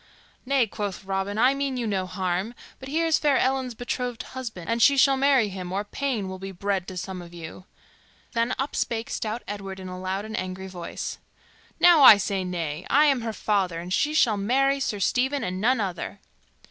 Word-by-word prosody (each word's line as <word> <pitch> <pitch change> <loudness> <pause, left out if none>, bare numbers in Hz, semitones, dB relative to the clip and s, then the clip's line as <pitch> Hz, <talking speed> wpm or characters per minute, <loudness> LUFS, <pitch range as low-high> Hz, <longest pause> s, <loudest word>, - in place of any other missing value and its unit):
"Nay," 275 -3 +3
quoth 205 -2 -5
Robin, 195 +1 -2
"I 255 +4 +5
mean 275 -2 -2
you 240 - -2
no 190 -3 -1
harm; 185 +4 -2 0.2
but 265 - -9
here 325 +3 +1
is 325 -1 +3
fair 290 -3 +3
Ellen's 260 -2 0
betrothed 245 0 -3
husband, 230 -9 -7
and 230 0 0
she 280 +2 +6
shall 270 0 +5
marry 265 -5 +3
him 185 -2 -6
or 195 +2 -1
pain 225 -1 -2
will 190 0 -6
be 195 0 -6
bred 195 0 -2
to 185 - -7
some 185 0 -5
of 175 0 -12
you." 170 +2 -9 0.7
Then 235 +2 0
up 270 +2 -3
spake 230 0 -2
stout 225 +1 -3
Edward 195 -2 -6
in 185 - -7
a 185 0 -7
loud 190 +2 -3
and 220 0 -6
angry 185 +1 -4
voice, 180 -2 -6 0.6
"Now 350 -3 +7
I 220 -6 +11
say 200 -1 -1
nay! 170 -3 -4
I 295 +3 +5
am 275 -4 +3
her 225 -1 -3
father, 195 -6 0
and 175 +2 -5
she 300 +9 +1
shall 225 -8 +4
marry 270 +7 +2
Sir 220 -6 -1
Stephen 265 +7 +1
and 185 +1 -3
none 250 +3 +3
other." 190 -4 -4
210 Hz, 205 wpm, -25 LUFS, 190-260 Hz, 0.7 s, I